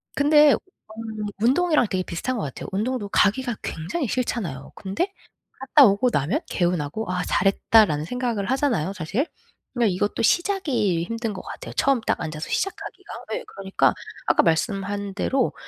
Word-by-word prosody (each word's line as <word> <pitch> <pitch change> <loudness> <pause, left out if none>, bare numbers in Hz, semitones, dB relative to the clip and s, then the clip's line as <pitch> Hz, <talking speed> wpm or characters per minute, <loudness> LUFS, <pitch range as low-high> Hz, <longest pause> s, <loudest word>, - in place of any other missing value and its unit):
근데 295 0 +6
음 220 - -7 0.2
운동이랑 295 +1 +3
되게 185 -1 -1
비슷한 235 +9 -3
것 - - -2
같아요. 135 - -6
운동도 215 +3 -1
가기가 235 +4 +2
굉장히 190 - -3
싫잖아요. 200 - -3
근데 215 - -2 0.5
갔다 270 +1 +6
오고 200 +6 +2
나면 175 - 0
개운하고 175 +2 -1
'아 180 0 -1
잘했다.'라는 195 -6 +3
생각을 240 -2 -2
하잖아요 235 - +1
사실. 200 - -1 0.5
그러니까 230 -7 +2
이것도 205 +3 -1
시작이 275 - +1
힘든 230 +1 -3
것 195 - -6
같아요 - - -8
처음 275 -4 +2
딱 - - -1
앉아서 155 -1 -5
시작하기가. 390 - -4 0.2
예 - - -4
그러니까 195 -1 +1 0.3
아까 - - +4
말씀한 195 +3 -1
대로 260 +5 0
215 Hz, 365 characters per minute, -24 LUFS, 190-260 Hz, 0.5 s, 근데